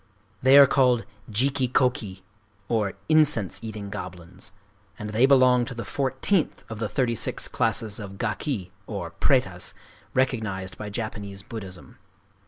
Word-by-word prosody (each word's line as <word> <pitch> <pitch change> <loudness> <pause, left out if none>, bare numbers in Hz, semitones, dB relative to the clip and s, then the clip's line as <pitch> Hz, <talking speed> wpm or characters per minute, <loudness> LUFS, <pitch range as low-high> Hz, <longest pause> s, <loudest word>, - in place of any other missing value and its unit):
They 130 +2 +7
are 140 - +11
called 125 -3 +3 0.2
Jiki 130 +3 +1
kō 125 -1 +4
ki, 95 -8 -8 0.4
or 105 -4 0
"incense 150 - +3
eating 105 -3 -6
goblins;" 90 -2 -8 0.5
and 105 0 -6
they 120 +5 +4
belong 130 -2 +5
to 125 - -7
the 115 -2 -5
fourteenth 140 - 0
of 110 - -6
the 110 -2 -2
thirty 125 -1 +1
six 115 - -2
classes 110 -1 -1
of 100 -2 -8
Gaki 100 - -2 0.2
(prêtas) - - -1 0.4
recognized 110 -8 -1
by 105 - -5
Japanese 100 -2 -5
Buddhism. 95 -6 -9
115 Hz, 135 wpm, -25 LUFS, 100-130 Hz, 0.5 s, are